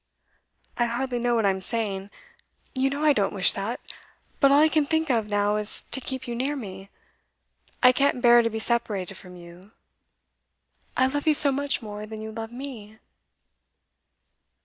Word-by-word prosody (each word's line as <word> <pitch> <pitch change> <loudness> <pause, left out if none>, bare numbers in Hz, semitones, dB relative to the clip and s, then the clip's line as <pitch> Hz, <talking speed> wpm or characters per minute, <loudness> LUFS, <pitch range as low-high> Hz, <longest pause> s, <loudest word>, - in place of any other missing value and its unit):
'I 240 - +3
hardly 245 +1 -2
know 240 0 +1
what 225 -2 +1
I 195 - +4
am 190 0 -5
saying. 200 -3 -3 0.6
You 265 0 +1
know 285 +2 -4
I 300 -1 +5
don't - - -1
wish - - +4
that. - - -4 0.6
But 275 -1 +5
all 280 - +6
I 310 - +6
can 310 -1 +2
think 320 0 0
of 225 -3 0
now 205 0 +1
is 210 0 -2
to 265 - 0
keep 260 0 -5
you 240 - -4
near 265 +5 -2
me. 195 -6 -8 0.9
I 250 - +8
can't 275 0 +1
bear 240 -1 +6
to 230 - 0
be 220 - -5
separated 220 -5 -1
from 180 -1 -13
you. 175 +4 -14 1.2
I 260 - +4
love 290 +3 -2
you 310 - +4
so 285 -2 +8
much 280 -2 -1
more 210 0 -7
than 220 0 -8
you 220 0 -7
love 225 0 -7
me. 240 -5 -9
235 Hz, 180 wpm, -25 LUFS, 210-270 Hz, 1.2 s, I